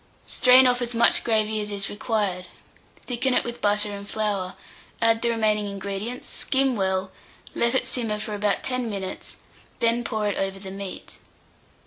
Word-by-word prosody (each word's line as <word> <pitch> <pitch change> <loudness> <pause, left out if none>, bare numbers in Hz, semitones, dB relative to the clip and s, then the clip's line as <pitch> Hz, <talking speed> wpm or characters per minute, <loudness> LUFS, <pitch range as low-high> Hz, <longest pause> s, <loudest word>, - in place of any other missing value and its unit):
Strain 255 +1 +6
off 250 0 +3
as 240 0 -3
much 235 0 +5
gravy 220 -1 +1
as 210 - -4
is 200 -1 -3
required, 205 -4 -2 0.6
thicken 250 +1 0
it - - +3
with 240 0 -6
butter 210 0 +2
and 200 0 -8
flour, 205 -4 -2 0.4
add 225 0 +3
the 235 - +1
remaining 215 -2 +1
ingredients, 200 +4 -5
skim 265 -1 +1
well, 190 -1 0 0.4
let 235 +2 +2
it - - +3
simmer 225 -4 -1
for 210 0 -5
about 205 0 0
10 255 -2 -1
minutes, 195 -3 -6 0.4
then 235 +1 +2
pour 220 -2 -1
it 205 - -1
over 195 0 -1
the 190 -1 -8
meat. 195 -1 -8
215 Hz, 165 wpm, -25 LUFS, 200-235 Hz, 0.6 s, Strain